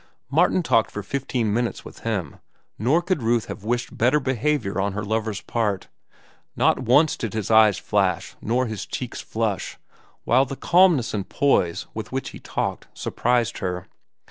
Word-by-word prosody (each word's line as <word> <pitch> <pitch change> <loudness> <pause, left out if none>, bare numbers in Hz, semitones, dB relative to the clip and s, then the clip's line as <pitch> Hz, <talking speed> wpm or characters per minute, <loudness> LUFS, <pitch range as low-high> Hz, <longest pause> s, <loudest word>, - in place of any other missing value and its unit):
Martin 185 - +3
talked 115 -8 +3
for 105 - -6
fifteen 125 -2 -1
minutes 120 +1 -1
with - - -11
him, 95 -10 -3 0.4
nor 140 - +2
could 180 -5 0
Ruth 115 0 +1
have 105 - -8
wished 120 +2 -2
better 125 +6 +3
behavior 130 -6 0
on 100 0 -1
her 105 +1 -3
lover's 110 -1 -2
part. 105 -5 -2 0.7
Not - - +3
once 130 +5 +4
did 110 -2 -5
his 110 -1 -2
eyes 110 -3 +6
flash - - 0
nor 125 +3 +1
his 110 -4 -5
cheeks - - -5
flush, - - -2 0.5
while 130 +3 +4
the 135 - -6
calmness 170 -6 +4
and 100 -3 -3
poise 95 -12 +1
with - - -6
which - - -3
he - - -10
talked - - -3
surprised 120 -2 0
her. 90 -1 -3
115 Hz, 165 wpm, -23 LUFS, 105-130 Hz, 0.7 s, eyes